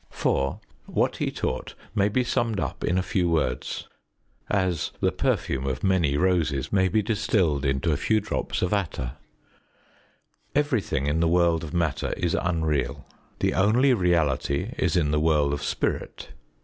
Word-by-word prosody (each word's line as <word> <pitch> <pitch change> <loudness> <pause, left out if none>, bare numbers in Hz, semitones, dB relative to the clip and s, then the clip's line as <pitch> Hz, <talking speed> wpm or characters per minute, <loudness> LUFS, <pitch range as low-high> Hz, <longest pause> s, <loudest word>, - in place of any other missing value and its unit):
4. 70 0 0 0.3
What - - 0
he - - -1
taught - - -4 0.2
may 100 0 +2
be 125 +4 +1
summed 115 -3 0
up - - -4
in 90 - +1
a 95 - +1
few 90 -1 0
words, 75 -7 -1 0.6
as 95 -5 0
the - - +2
perfume 65 +1 -1
of 65 -1 -3
many 85 -7 +2
roses 80 -6 +1
may 95 -1 +4
be 105 +4 +1
distilled 100 -9 +1
into 70 +4 +1
a 75 - +1
few 110 +8 +2
drops 105 -2 -2
of 90 - 0
attar: 75 -11 -2 1.4
Everything 125 - +1
in 75 +3 +1
the 85 - +3
world 85 -1 +3
of 80 - -6
Matter 85 -5 0
is 85 -2 0
unreal; 80 -7 -1 0.4
the - - +2
only 120 +8 +4
reality 85 - +1
is 90 -3 0
in 75 -4 +2
the 75 - +2
world 75 -2 +2
of 70 - -3
Spirit. - - -3
85 Hz, 160 wpm, -25 LUFS, 75-100 Hz, 1.4 s, may